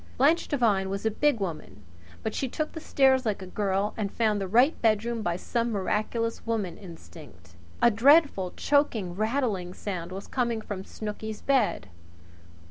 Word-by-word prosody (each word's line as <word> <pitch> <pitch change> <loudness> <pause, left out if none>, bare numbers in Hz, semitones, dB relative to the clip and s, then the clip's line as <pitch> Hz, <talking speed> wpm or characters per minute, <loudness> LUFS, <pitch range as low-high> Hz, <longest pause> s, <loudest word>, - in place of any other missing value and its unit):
Blanche 305 +6 +3
Devine 215 -9 +1
was 200 +2 -4
a 220 - +2
big 290 +2 +1
woman, 155 - -6 0.4
but 220 - -2
she 270 - -1
took 310 +5 -3
the 320 - -7
stairs 265 -4 +3
like 210 -4 -2
a - - -6
girl 195 +1 -1
and 205 -3 -3
found 215 -3 +1
the 195 - -2
right 245 - +3
bedroom 225 +1 +1
by 175 -4 -1
some 235 +6 -2
miraculous 215 +3 -1
woman 220 -6 -2
instinct. 155 - -13 0.3
A 235 - +7
dreadful 250 - +4
choking, 240 -11 +1
rattling 215 -5 -1
sound 180 -4 -5
was 195 +2 -6
coming 235 -3 -1
from 205 -3 -6
Snooky's 215 +1 -6
bed. 265 - +1
215 Hz, 160 wpm, -27 LUFS, 190-240 Hz, 0.4 s, A